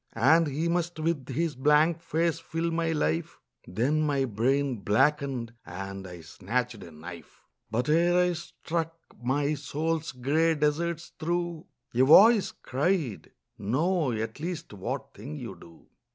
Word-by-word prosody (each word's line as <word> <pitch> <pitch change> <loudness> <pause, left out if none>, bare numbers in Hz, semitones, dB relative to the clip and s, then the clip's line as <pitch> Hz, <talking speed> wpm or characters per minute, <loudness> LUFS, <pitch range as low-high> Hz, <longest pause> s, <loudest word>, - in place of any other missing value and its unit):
And 155 +8 +4
he 150 +4 -1
must 170 -1 -1
with 155 -5 -1
his 165 -1 -1
blank 150 +5 +3
face 165 +1 0
fill 165 +1 -2
my 165 0 0
life 80 - -1 0.3
Then 130 +12 +1
my 145 -3 +1
brain 130 +4 +1
blackened; 130 +2 +1
and 95 0 -7
I 90 -2 -9
snatched 120 +7 -3
a - - -10
knife. 80 +1 -11 0.3
But 120 +3 -1
ere 170 +3 +4
I 180 0 +3
struck, 165 0 -4 0.2
my 140 +4 +1
soul's 155 +2 -2
grey 150 +6 +1
deserts 160 +3 -1
through 170 0 -2 0.3
A 125 +2 +4
voice 205 - +7
cried, 140 - -1 0.3
'Know 155 - +1
at 110 +4 -4
least 170 -6 -5
what 95 -2 -5
thing 75 - -8
you - - -6
do.' 85 -1 -16
150 Hz, 140 wpm, -28 LUFS, 120-165 Hz, 0.3 s, voice